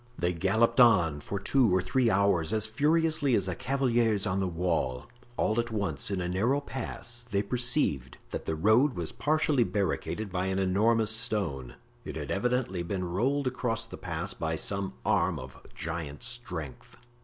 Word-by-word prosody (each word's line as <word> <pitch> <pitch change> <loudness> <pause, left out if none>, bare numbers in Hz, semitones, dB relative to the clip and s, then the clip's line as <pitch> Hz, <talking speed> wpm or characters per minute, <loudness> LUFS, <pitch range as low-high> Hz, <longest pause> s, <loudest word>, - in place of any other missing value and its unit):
They 90 +1 0
galloped 110 +8 +2
on 85 -11 +5
for 100 +7 -4
two 130 +3 +3
or - - +3
three 115 +7 +1
hours 95 -3 +2
as 110 -1 +2
furiously 150 +3 +2
as 100 - +1
the 95 - -2
cavaliers 120 -5 +1
on 95 -1 0
the 95 - 0
wall. 80 -8 -1 0.3
All 110 +2 +1
at 120 0 -1
once, 100 -10 -2
in 100 -2 -2
a 90 - -2
narrow 110 +10 +1
pass, 120 -3 -6
they 100 -2 0
perceived 120 - +2
that - - -5
the 80 - -1
road 110 - +3
was 85 -3 -3
partially 150 -4 +2
barricaded 105 0 -2
by 90 0 -1
an 95 0 -1
enormous 105 +4 +2
stone. 95 - -1 0.3
It 75 - -7
had 75 -3 -5
evidently 120 -3 0
been 90 +2 -3
rolled 135 +9 0
across 120 -3 -1
the 115 - -9
pass - - -4
by 80 0 -2
some 100 +3 -2
arm - - +2
of 65 0 -10
giant 80 -1 -5
strength. 105 - -5
105 Hz, 170 wpm, -29 LUFS, 90-120 Hz, 0.3 s, on